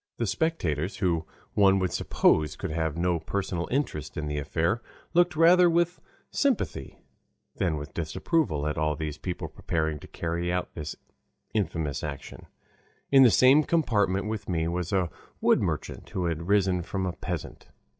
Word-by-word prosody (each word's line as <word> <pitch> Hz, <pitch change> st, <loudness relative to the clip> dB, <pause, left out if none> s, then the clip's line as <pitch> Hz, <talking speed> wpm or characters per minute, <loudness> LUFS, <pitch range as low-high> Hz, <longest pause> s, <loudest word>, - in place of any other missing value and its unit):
The 115 Hz, -, 0 dB
spectators, 95 Hz, -, -1 dB
who 85 Hz, -4 st, 0 dB, 0.3 s
one 95 Hz, -1 st, +5 dB
would 95 Hz, -2 st, 0 dB
suppose 75 Hz, -2 st, +2 dB
could -, -, -5 dB
have 80 Hz, -1 st, -1 dB
no 85 Hz, 0 st, +1 dB
personal 90 Hz, 0 st, -3 dB
interest 125 Hz, -, -2 dB
in 75 Hz, -, -2 dB
the 75 Hz, 0 st, -2 dB
affair, 85 Hz, +9 st, 0 dB, 0.3 s
looked 175 Hz, -1 st, +3 dB
rather 175 Hz, +2 st, +6 dB
with 170 Hz, +1 st, +1 dB, 0.3 s
sympathy 250 Hz, -, -1 dB, 0.6 s
than 85 Hz, -4 st, 0 dB
with 75 Hz, +1 st, -7 dB
disapproval 80 Hz, -, 0 dB
at 75 Hz, +1 st, -1 dB
all 75 Hz, -1 st, +1 dB
these 75 Hz, 0 st, -5 dB
people 90 Hz, -2 st, -4 dB
preparing 80 Hz, -2 st, -2 dB
to -, -, -12 dB
carry 85 Hz, +1 st, -2 dB
out 90 Hz, 0 st, -2 dB
this 75 Hz, -2 st, -5 dB, 0.6 s
infamous 80 Hz, -8 st, -1 dB
action. 70 Hz, -2 st, -7 dB, 0.6 s
In 135 Hz, -1 st, +8 dB
the 130 Hz, -, +8 dB
same 130 Hz, +8 st, +6 dB
compartment 105 Hz, -, +1 dB
with 110 Hz, -2 st, -4 dB
me 80 Hz, -2 st, 0 dB
was 85 Hz, +1 st, -2 dB
a 90 Hz, -4 st, +1 dB, 0.3 s
wood -, -, +4 dB
merchant, -, -, -3 dB
who 90 Hz, -, -2 dB
had 85 Hz, 0 st, -2 dB
risen 95 Hz, -3 st, +3 dB
from 95 Hz, +2 st, -3 dB
a 90 Hz, -, -2 dB
peasant. 90 Hz, -2 st, -6 dB
90 Hz, 160 wpm, -27 LUFS, 80-110 Hz, 0.6 s, In